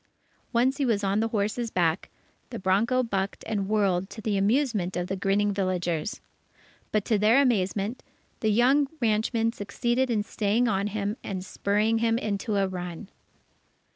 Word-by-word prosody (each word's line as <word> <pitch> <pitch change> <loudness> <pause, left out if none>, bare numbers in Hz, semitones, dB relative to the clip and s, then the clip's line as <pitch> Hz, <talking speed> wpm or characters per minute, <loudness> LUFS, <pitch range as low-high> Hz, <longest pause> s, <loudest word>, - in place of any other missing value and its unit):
Once, 255 +3 +2
he 280 - +1
was 210 -3 +1
on 195 +1 +1
the 225 - +1
horse's 220 +2 -1
back, 170 -5 0 0.4
the 235 - -6
bronco 225 +7 +2
bucked 195 -4 -3
and 205 -3 -2
whirled 195 -3 +1
to - - -9
the 215 -1 -1
amusement 205 -3 +1
of 175 - -1
the 195 - -3
grinning 200 +2 +1
villagers. 180 -2 -2 0.7
But 215 -2 0
to 215 -3 +2
their 220 +6 +5
amazement, 215 -2 0 0.4
the 220 - +1
young 260 +6 +4
ranchman 225 0 +1
succeeded 240 +5 -1
in 215 -3 +1
staying 215 +3 0
on 200 -1 0
him 205 +1 -3
and 190 -2 -4
spurring 210 +4 +1
him 230 0 +2
into 210 -1 -2
a 195 -1 +2
run. 180 +1 -6
210 Hz, 160 wpm, -27 LUFS, 195-230 Hz, 0.7 s, their